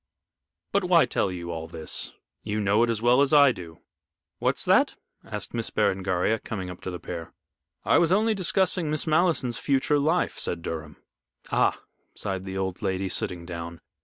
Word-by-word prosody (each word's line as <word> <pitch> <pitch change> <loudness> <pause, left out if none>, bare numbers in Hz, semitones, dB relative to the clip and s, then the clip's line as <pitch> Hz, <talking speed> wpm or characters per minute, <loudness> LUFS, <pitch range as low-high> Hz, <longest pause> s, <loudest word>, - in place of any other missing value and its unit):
But 200 0 +1
why 175 -2 +5
tell 95 - 0
you 85 -1 -5
all 80 -1 -5
this 80 -1 -3 0.3
you 105 0 -3
know 105 +1 +2
it 120 - +3
as 115 -1 -1
well 125 +3 +5
as 140 - +3
I 145 -2 +7
do." 85 -7 -10 0.6
"What's - - +1
that?" - - +4 0.3
asked - - -6
Miss - - -2
Berengaria, 95 +3 +1
coming 95 -4 -5
up 90 - -11
to - - -5
the 90 -1 -6
pair. 85 -2 -7 0.5
"I - - +5
was 170 0 +2
only 215 +3 +3
discussing 185 -3 +2
Miss 155 0 0
Malleson's 155 -7 +2
future 140 +1 +1
life," 160 +5 0
said 85 -1 -2
Durham. 80 -2 -6 0.5
"Ah," - - +2 0.4
sighed 95 -1 -3
the 95 0 -5
old 95 0 -3
lady, 95 -1 -1
sitting 85 -1 -1
down. 85 -1 -7
100 Hz, 175 wpm, -26 LUFS, 90-150 Hz, 0.6 s, I